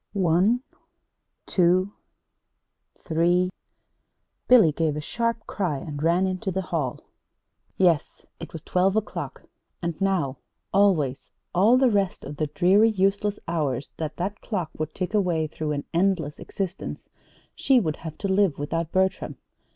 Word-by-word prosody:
One 195 Hz, +6 st, +2 dB, 0.8 s
two 185 Hz, +2 st, +2 dB, 1.0 s
three 175 Hz, +2 st, +1 dB, 1.0 s
Billy 230 Hz, -11 st, +7 dB
gave 155 Hz, 0 st, 0 dB
a -, -, -2 dB
sharp 230 Hz, +7 st, -2 dB
cry 180 Hz, -8 st, -2 dB
and 145 Hz, +1 st, -6 dB
ran 170 Hz, +4 st, +3 dB
into 185 Hz, +2 st, -2 dB
the 190 Hz, +1 st, -2 dB
hall. 160 Hz, -9 st, -2 dB, 0.8 s
Yes, 175 Hz, -5 st, +1 dB
it 165 Hz, -, -8 dB
was 165 Hz, -1 st, -8 dB
twelve 185 Hz, +2 st, +2 dB
o'clock. 220 Hz, -1 st, -3 dB, 0.4 s
And 170 Hz, +1 st, -4 dB
now, 175 Hz, -9 st, 0 dB, 0.4 s
always, 155 Hz, -10 st, +2 dB, 0.2 s
all 210 Hz, +8 st, +5 dB
the 255 Hz, -2 st, +4 dB
rest 200 Hz, -3 st, 0 dB
of 145 Hz, +1 st, -7 dB
the 155 Hz, -, 0 dB
dreary, 190 Hz, +8 st, +4 dB
useless 200 Hz, 0 st, +1 dB
hours 145 Hz, -6 st, -2 dB
that 155 Hz, -1 st, -4 dB
that 195 Hz, +4 st, -3 dB
clock 180 Hz, -8 st, -3 dB
would 155 Hz, 0 st, -3 dB
tick 185 Hz, +2 st, -3 dB
away 175 Hz, -6 st, +1 dB
through 155 Hz, 0 st, -4 dB
an 145 Hz, -1 st, -3 dB
endless 170 Hz, -4 st, +1 dB
existence, 190 Hz, -1 st, -5 dB, 0.5 s
she 265 Hz, -2 st, +3 dB
would 155 Hz, -8 st, -2 dB
have 160 Hz, -2 st, -8 dB
to 200 Hz, -, -3 dB
live 190 Hz, -5 st, +2 dB
without 160 Hz, +3 st, -2 dB
Bertram. 190 Hz, 0 st, 0 dB
180 Hz, 140 wpm, -25 LUFS, 155-195 Hz, 1.0 s, Billy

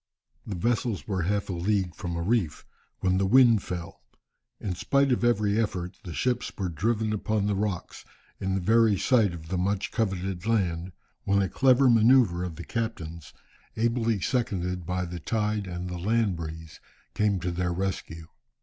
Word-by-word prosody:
The 105 Hz, -, -3 dB
vessels 115 Hz, +2 st, -1 dB
were 95 Hz, -3 st, -1 dB
half 100 Hz, +4 st, 0 dB
a 95 Hz, -, -3 dB
league 95 Hz, 0 st, 0 dB
from 90 Hz, -3 st, -5 dB
a 85 Hz, -, -2 dB
reef, 100 Hz, -5 st, 0 dB, 0.4 s
when 95 Hz, 0 st, +2 dB
the 95 Hz, -, +2 dB
wind 120 Hz, -1 st, +6 dB
fell. 85 Hz, -2 st, -6 dB, 0.6 s
In 95 Hz, -, -3 dB
spite 140 Hz, +9 st, +2 dB
of 120 Hz, -, +1 dB
every 105 Hz, -2 st, +2 dB
effort, 90 Hz, -3 st, -3 dB
the 90 Hz, -, -7 dB
ships 125 Hz, -1 st, 0 dB
were 95 Hz, -3 st, -2 dB
driven 110 Hz, +5 st, 0 dB
upon 105 Hz, 0 st, 0 dB
the 105 Hz, -, +1 dB
rocks, 100 Hz, -3 st, -3 dB, 0.4 s
in 95 Hz, 0 st, -1 dB
the 95 Hz, -, -1 dB
very 110 Hz, +1 st, +4 dB
sight 110 Hz, -2 st, +3 dB
of 80 Hz, -2 st, -9 dB
the 90 Hz, -1 st, -1 dB
much 100 Hz, +2 st, -1 dB
coveted 95 Hz, -3 st, -2 dB
land, 90 Hz, -5 st, 0 dB, 0.3 s
when 100 Hz, 0 st, +2 dB
a -, -, 0 dB
clever 130 Hz, +6 st, +4 dB
manoeuvre 115 Hz, -6 st, +5 dB
of 90 Hz, -3 st, -5 dB
the 85 Hz, -, -8 dB
captain's, 85 Hz, -9 st, -4 dB, 0.5 s
ably 115 Hz, -1 st, +1 dB
seconded 90 Hz, -6 st, -1 dB
by 90 Hz, 0 st, -1 dB
the 85 Hz, 0 st, -6 dB
tide 105 Hz, +2 st, -1 dB
and 90 Hz, 0 st, -5 dB
the 90 Hz, -1 st, -5 dB
land 110 Hz, +1 st, +1 dB
breeze, 80 Hz, -1 st, -8 dB, 0.3 s
came 105 Hz, -2 st, +1 dB
to 90 Hz, +1 st, -2 dB
their 90 Hz, 0 st, -1 dB
rescue. 85 Hz, -3 st, -3 dB
95 Hz, 175 wpm, -27 LUFS, 90-110 Hz, 0.6 s, wind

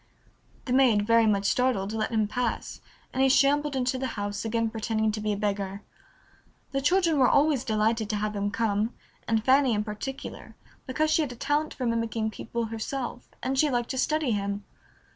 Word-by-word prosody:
The 250 Hz, -, -1 dB
maid, 240 Hz, -6 st, +4 dB
very 230 Hz, 0 st, +4 dB
much 200 Hz, -1 st, +1 dB
startled, 220 Hz, -4 st, +1 dB
let 220 Hz, -1 st, -1 dB
him 220 Hz, -2 st, +1 dB
pass, 245 Hz, +1 st, -3 dB, 0.3 s
and 260 Hz, -, 0 dB
he 270 Hz, -, +5 dB
shambled 285 Hz, +2 st, +3 dB
into 255 Hz, 0 st, 0 dB
the 265 Hz, -, -1 dB
house, 205 Hz, 0 st, -3 dB
again 225 Hz, 0 st, 0 dB
pretending 220 Hz, 0 st, 0 dB
to 215 Hz, 0 st, -4 dB
be 210 Hz, 0 st, -1 dB
a 205 Hz, -, -1 dB
beggar. 200 Hz, -1 st, -2 dB, 0.9 s
The 275 Hz, -, -1 dB
children 335 Hz, 0 st, +3 dB
were 255 Hz, -, +5 dB
always 285 Hz, -3 st, +3 dB
delighted 220 Hz, -1 st, 0 dB
to 215 Hz, -, 0 dB
have 210 Hz, 0 st, -2 dB
him 200 Hz, 0 st, -1 dB
come, 215 Hz, +1 st, 0 dB, 0.3 s
and 225 Hz, -1 st, +1 dB
Fanny 265 Hz, -3 st, +4 dB
in 210 Hz, -, 0 dB
particular, 230 Hz, +6 st, -7 dB, 0.3 s
because 310 Hz, +4 st, 0 dB
she 320 Hz, -, +4 dB
had 290 Hz, -5 st, -2 dB
a -, -, -8 dB
talent 295 Hz, +5 st, -1 dB
for 255 Hz, -, -3 dB
mimicking 230 Hz, -1 st, -1 dB
people 235 Hz, +1 st, -4 dB
herself, 240 Hz, +3 st, -5 dB
and 265 Hz, +1 st, 0 dB
she 300 Hz, -, +4 dB
liked 240 Hz, -3 st, -1 dB
to 260 Hz, -, -4 dB
study 305 Hz, -2 st, +1 dB
him. 200 Hz, -1 st, -2 dB
230 Hz, 190 wpm, -27 LUFS, 215-265 Hz, 0.9 s, he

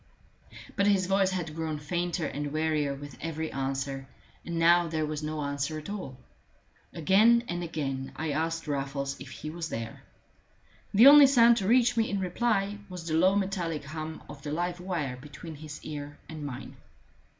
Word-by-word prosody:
But 200 Hz, 0 st, +2 dB
his 195 Hz, -2 st, +3 dB
voice 195 Hz, 0 st, +3 dB
had 175 Hz, -5 st, -3 dB
grown 160 Hz, -1 st, -3 dB
fainter 170 Hz, +3 st, -2 dB
and 145 Hz, 0 st, -3 dB
wearier 155 Hz, -2 st, 0 dB
with 140 Hz, -2 st, -10 dB
every 160 Hz, 0 st, -3 dB
answer, 135 Hz, 0 st, -3 dB, 0.4 s
and 170 Hz, -1 st, -4 dB
now 170 Hz, +1 st, +5 dB
there 160 Hz, -1 st, -1 dB
was 150 Hz, 0 st, -4 dB
no 155 Hz, 0 st, -3 dB
answer 140 Hz, +2 st, -2 dB
at 155 Hz, +5 st, -7 dB
all. 160 Hz, -11 st, -6 dB, 0.7 s
Again 215 Hz, +8 st, +4 dB
and 175 Hz, 0 st, -3 dB
again 135 Hz, -5 st, -3 dB
I 160 Hz, -1 st, -2 dB
asked 165 Hz, +2 st, -2 dB
Raffles 140 Hz, -1 st, -2 dB
if 135 Hz, -, -9 dB
he 130 Hz, +6 st, -7 dB
was 165 Hz, -1 st, -5 dB
there; 115 Hz, 0 st, -5 dB, 0.9 s
the 215 Hz, +5 st, +7 dB
only 285 Hz, 0 st, +10 dB
sound 235 Hz, -3 st, +6 dB
to 190 Hz, -, -1 dB
reach 245 Hz, +1 st, +4 dB
me 225 Hz, -, +2 dB
in 200 Hz, -, -1 dB
reply 200 Hz, +1 st, 0 dB
was 180 Hz, -2 st, -7 dB
the 160 Hz, -, -3 dB
low 185 Hz, +5 st, +4 dB
metallic 185 Hz, -6 st, -1 dB
hum 155 Hz, +2 st, -6 dB
of 145 Hz, -1 st, -10 dB
the 145 Hz, -, -5 dB
live 175 Hz, +3 st, -2 dB
wire 165 Hz, -8 st, -3 dB
between 150 Hz, +5 st, -10 dB
his 150 Hz, 0 st, -8 dB
ear 145 Hz, -1 st, -6 dB
and 155 Hz, -2 st, -7 dB
mine. 135 Hz, -4 st, -7 dB
160 Hz, 175 wpm, -29 LUFS, 145-185 Hz, 0.9 s, only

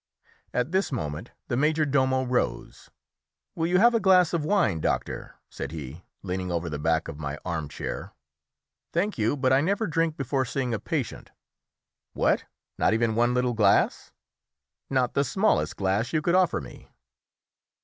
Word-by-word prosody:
At 125 Hz, +5 st, -1 dB
this 190 Hz, -2 st, +1 dB
moment 80 Hz, -, -4 dB, 0.2 s
the 120 Hz, -, -1 dB
major 155 Hz, +3 st, +2 dB
domo 130 Hz, -2 st, +2 dB
rose. 125 Hz, -, -2 dB, 0.6 s
"Will 165 Hz, 0 st, -1 dB
you 180 Hz, +1 st, +3 dB
have 235 Hz, +5 st, +6 dB
a 230 Hz, -, +3 dB
glass 185 Hz, -4 st, +4 dB
of 165 Hz, -3 st, 0 dB
wine, 155 Hz, -, +2 dB
doctor?" -, -, -2 dB
said -, -, -6 dB
he, 80 Hz, +1 st, -8 dB, 0.2 s
leaning 90 Hz, -1 st, -3 dB
over 85 Hz, -1 st, -2 dB
the 75 Hz, -, -4 dB
back 80 Hz, +1 st, +1 dB
of 75 Hz, -, -7 dB
my 70 Hz, -1 st, -4 dB
arm 85 Hz, -5 st, -3 dB
chair. 70 Hz, -, -5 dB, 0.8 s
"Thank 190 Hz, -, -1 dB
you, 110 Hz, +6 st, +1 dB
but 130 Hz, -1 st, +2 dB
I 135 Hz, -, +5 dB
never 200 Hz, +7 st, 0 dB
drink 165 Hz, -2 st, 0 dB
before 135 Hz, 0 st, 0 dB
seeing 125 Hz, 0 st, -2 dB
a 110 Hz, -, -1 dB
patient." 140 Hz, -, -4 dB, 0.8 s
"What! -, -, +1 dB, 0.3 s
not 110 Hz, -, +3 dB
even 115 Hz, -1 st, +1 dB
one 120 Hz, +2 st, +2 dB
little 125 Hz, -1 st, +1 dB
glass?" 105 Hz, -3 st, +2 dB, 0.8 s
"Not 130 Hz, -3 st, +1 dB
the 140 Hz, -, +2 dB
smallest 195 Hz, +9 st, +1 dB
glass 100 Hz, +7 st, 0 dB
you 155 Hz, -1 st, +1 dB
could 170 Hz, -, +1 dB
offer 185 Hz, -1 st, +3 dB
me." 65 Hz, -, -12 dB
125 Hz, 165 wpm, -26 LUFS, -, 0.8 s, have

